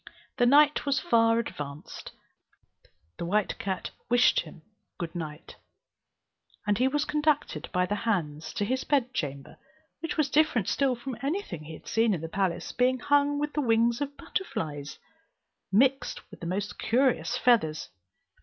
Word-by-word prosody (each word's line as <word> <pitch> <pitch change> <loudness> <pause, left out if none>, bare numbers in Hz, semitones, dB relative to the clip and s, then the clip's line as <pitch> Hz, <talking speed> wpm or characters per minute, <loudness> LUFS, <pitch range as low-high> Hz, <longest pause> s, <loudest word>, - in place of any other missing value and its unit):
When 245 0 +4
night 295 +2 +5
was 275 -1 +2
far 230 -1 +3
advanced, 145 -10 -6 1.1
the - - -2
white 205 +3 0
cat 190 -2 -3 0.2
wished 245 0 +5
him 160 -1 -8
a 215 -1 -44
good 170 -1 -5
night, 155 -3 -7 1.1
and 205 +1 +1
he 255 - +4
was 295 +2 0
conducted 300 -1 0
by 180 -1 +2
the 200 - -2
hands 160 -9 -2
to 205 - -1
his 260 +4 -1
bedchamber, 230 - -2 0.4
which 325 +1 -4
was 290 -3 +1
different 295 -9 +3
still 270 -3 +1
from 245 0 -6
any 320 +9 -1
thing 155 - -8
he 160 - -8
had - - -12
seen 225 -2 +2
in 160 - -6
the 165 - -5
palace, 185 -2 -1
being 255 +1 +2
hung 285 +2 +2
with 295 +1 -2
the 300 - 0
wings 235 0 +2
of 285 0 -4
butterflies, 150 - -4 0.7
mixed 260 +5 +1
with - - -12
the 170 - -5
most 200 +4 -3
curious 250 0 +1
feathers. 215 -13 +2
230 Hz, 160 wpm, -28 LUFS, 175-275 Hz, 1.1 s, night